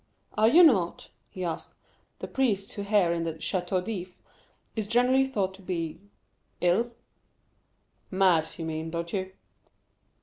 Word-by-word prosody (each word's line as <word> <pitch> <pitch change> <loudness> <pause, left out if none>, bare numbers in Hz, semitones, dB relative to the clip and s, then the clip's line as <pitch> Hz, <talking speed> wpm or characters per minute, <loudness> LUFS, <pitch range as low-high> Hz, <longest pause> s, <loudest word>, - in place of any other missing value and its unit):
"Are 215 +1 +4
you 330 +10 +7
not," 195 - +3 0.2
he 185 - -6
asked, 170 -2 -4 0.4
"the - - -6
priest 210 -7 0
who 205 - -5
here 200 -4 +3
in 170 -1 -1
the 165 -1 -2
Château 180 +2 -1
d'If 185 -4 -5 0.6
is 215 -3 -2
generally 250 +4 +3
thought 200 -8 -1
to 195 - -14
be—ill?" 180 +4 -3 1.2
"Mad, 185 -4 +3
you 165 - -4
mean, 160 0 -3
don't 170 +1 -4
you?" 190 -1 -2
190 Hz, 135 wpm, -28 LUFS, 170-215 Hz, 1.2 s, you